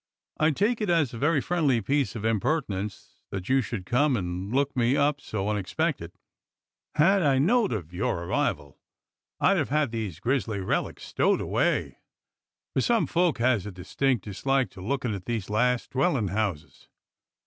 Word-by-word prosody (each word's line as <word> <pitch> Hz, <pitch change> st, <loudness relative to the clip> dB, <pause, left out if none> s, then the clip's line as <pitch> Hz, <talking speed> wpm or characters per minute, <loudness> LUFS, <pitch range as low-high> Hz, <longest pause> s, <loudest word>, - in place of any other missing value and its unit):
I 155 Hz, -, +4 dB
take 210 Hz, -, +1 dB
it 210 Hz, -, -1 dB
as 165 Hz, -8 st, +2 dB
a 115 Hz, -, -6 dB
very 150 Hz, +2 st, +3 dB
friendly 145 Hz, -6 st, +1 dB
piece 135 Hz, +4 st, 0 dB
of 110 Hz, -1 st, -4 dB
impertinence 105 Hz, -, -2 dB
that 95 Hz, -2 st, -5 dB
you 135 Hz, 0 st, +4 dB
should 105 Hz, -7 st, -5 dB
come 130 Hz, +4 st, +2 dB
and 90 Hz, +1 st, -4 dB
look 140 Hz, +2 st, +1 dB
me 125 Hz, +2 st, +2 dB
up 140 Hz, 0 st, +1 dB
so 100 Hz, -2 st, -3 dB
unexpected. 105 Hz, -3 st, -1 dB, 0.8 s
Had 190 Hz, +6 st, +4 dB
I 140 Hz, -5 st, +3 dB
knowed 210 Hz, -, +3 dB
of 90 Hz, -6 st, -4 dB
your 90 Hz, -2 st, -1 dB
arrival 75 Hz, -4 st, -2 dB, 0.6 s
I'd 195 Hz, +1 st, +4 dB
have 155 Hz, -, 0 dB
had 150 Hz, -3 st, +1 dB
these 105 Hz, -8 st, -4 dB
grizzly 115 Hz, -2 st, -1 dB
relics 95 Hz, -, -2 dB
stowed -, -, +1 dB
away, -, -, 0 dB, 0.7 s
for 130 Hz, -, +1 dB
some 230 Hz, -, +2 dB
folk 170 Hz, -2 st, +1 dB
has 115 Hz, -5 st, +1 dB
a -, -, -5 dB
distinct 115 Hz, +5 st, -1 dB
dislike 130 Hz, +3 st, 0 dB
to 95 Hz, -, -11 dB
lookin' 125 Hz, +2 st, -2 dB
at 95 Hz, -2 st, -6 dB
these 110 Hz, -4 st, -3 dB
last 125 Hz, +3 st, +1 dB
dwellin' 135 Hz, -, +1 dB
houses." 100 Hz, -6 st, -3 dB
125 Hz, 165 wpm, -27 LUFS, 100-145 Hz, 0.8 s, I